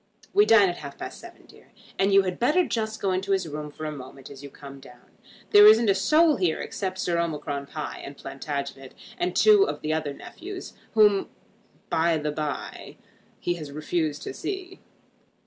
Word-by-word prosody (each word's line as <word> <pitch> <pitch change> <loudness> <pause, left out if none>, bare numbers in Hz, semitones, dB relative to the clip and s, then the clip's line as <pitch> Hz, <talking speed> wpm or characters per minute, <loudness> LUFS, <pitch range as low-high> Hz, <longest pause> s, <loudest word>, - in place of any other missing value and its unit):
We 410 +1 +5
dine 210 -3 +7
at 175 - -3
half 140 -1 -9
past - - -7
seven, - - -14
dear: - - -20 0.3
and 195 +1 +3
you 195 0 +6
had 185 -1 -4
better 305 +9 +3
just 220 -1 -2
go 195 - 0
into 190 +2 0
his 190 -3 0
room 150 0 -6
for 155 +1 -8
a 155 - -3
moment 135 -1 -10
as 140 -1 -11
you 140 - -9
come 140 0 -12
down. 125 -2 -17 0.4
There 205 0 +9
isn't 220 0 +6
a - - +4
soul 305 - +4
here 175 -4 0
except 190 -2 -4
Sir 175 -2 0
Omicron 150 -4 -3
Pie, 150 +1 -6
and 140 0 -9
Plantagenet, 140 -1 -6 0.2
and 355 +1 -1
two 415 -2 +6
of - - -4
the 155 +1 -1
other 155 -3 -2
nephews, 375 +2 -9 0.2
whom, 210 -3 +4 0.6
by 165 0 +2
the 150 0 -2
bye, 150 -1 -5 0.4
he 175 - -1
has 155 -4 -8
refused 155 0 -2
to - - -5
see. 375 - -6
170 Hz, 190 wpm, -25 LUFS, 145-210 Hz, 0.6 s, There